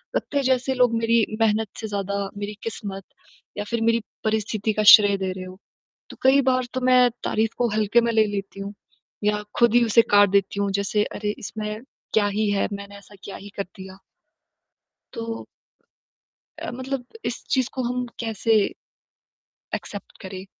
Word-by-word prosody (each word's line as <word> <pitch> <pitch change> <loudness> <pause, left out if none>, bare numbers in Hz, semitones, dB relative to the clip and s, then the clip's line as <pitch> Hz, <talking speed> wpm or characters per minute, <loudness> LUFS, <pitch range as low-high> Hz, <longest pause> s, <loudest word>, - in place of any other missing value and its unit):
लगता 285 - -1
है, 280 - +2
जैसे 260 0 +1
लोग 250 -2 +3
मेरी 230 -1 +3 0.2
मेहनत 220 0 +2
से 220 - -4
ज़्यादा 200 -1 -2
मेरी 205 +1 -4
किस्मत 200 -3 -5 0.5
या 205 - -1
फिर 235 -1 -1
मेरी 230 +1 +2 0.2
परिस्थिति 215 0 0
का 215 - 0
श्रेय 205 -2 +2
दे 190 -1 -2
रहे 185 0 -6
हो। 185 0 -10 0.5
तो - - -11
कई 265 +2 +6
बार 255 0 +1
तो 255 - -2
मैं 250 -1 +5
तारीफ़ 220 +1 0
को 240 -1 +1
हल्के 215 +2 +3
में 235 0 +1
ले 220 -1 +4
लेती 195 -1 -5
हूँ 200 +1 -6 0.5
या 210 0 +1 0.2
खुद 235 -2 +5
ही 240 - +6
उसे 230 +1 +6
काट 205 0 +6
देती 200 0 +1
हूँ। 200 -1 0
जैसे 200 +1 +1
अरे! 210 0 -3
इसमें 215 +1 -5 0.3
क्या 215 -2 +4
ही 205 +1 0
है, 200 - +1
मैंने 200 0 -8
ऐसा 200 +1 -16
क्या 200 - -7
ही 205 - -11
कर 200 - 0
दिया। 190 0 -10 1.2
तो 230 -1 -5 1.1
अ, - - -5
मतलब 260 0 -4 0.2
इस - - -3
चीज़ 260 -2 +2
को 260 - -3
हम 250 +1 -2
कैसे, 225 -1 -1 1.2
एक्सेप्ट 205 - -8
करें? 190 0 -7
215 Hz, 175 wpm, -24 LUFS, 200-235 Hz, 1.2 s, कई